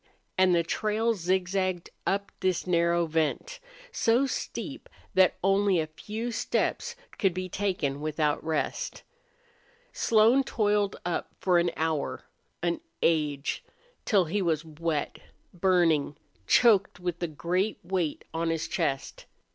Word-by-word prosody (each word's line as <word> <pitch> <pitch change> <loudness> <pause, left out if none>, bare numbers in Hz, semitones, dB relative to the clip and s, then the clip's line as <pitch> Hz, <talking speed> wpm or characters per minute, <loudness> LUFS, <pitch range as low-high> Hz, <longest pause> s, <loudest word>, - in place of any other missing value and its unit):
And 185 -1 +4
the 170 - +3
trail 215 +6 0
zigzagged 185 -1 -1 0.2
up 200 +1 0
this 185 -2 0
narrow 170 -1 +2
vent, 165 - -1 0.3
so 240 - +3
steep 270 - -5 0.2
that 185 -1 +5
only 195 -1 +3
a 160 - 0
few 215 +9 -5
steps 475 - -1 0.2
could 190 -4 +2
be 185 0 -3
taken 180 -8 -1
without 150 -1 0
rest. 160 - -2 0.9
Slone 230 +4 +4
toiled 205 -5 +1
up 175 - -2
for 180 -2 +3
an 170 0 +2
hour 160 -2 -1 0.4
an 170 -1 0 0.2
age 150 -4 +1 0.4
till 200 -5 +3
he 195 +6 -1
was 165 -3 0
wet, 155 -1 -3 0.3
burning, 170 -5 +2 0.3
choked, 205 -7 +4
with 175 -1 -3
a 175 - 0
great 175 +7 -1
weight 175 -4 -2
on 165 0 0
his 165 -1 -1
chest. 145 -6 -2
180 Hz, 125 wpm, -28 LUFS, 160-200 Hz, 0.9 s, that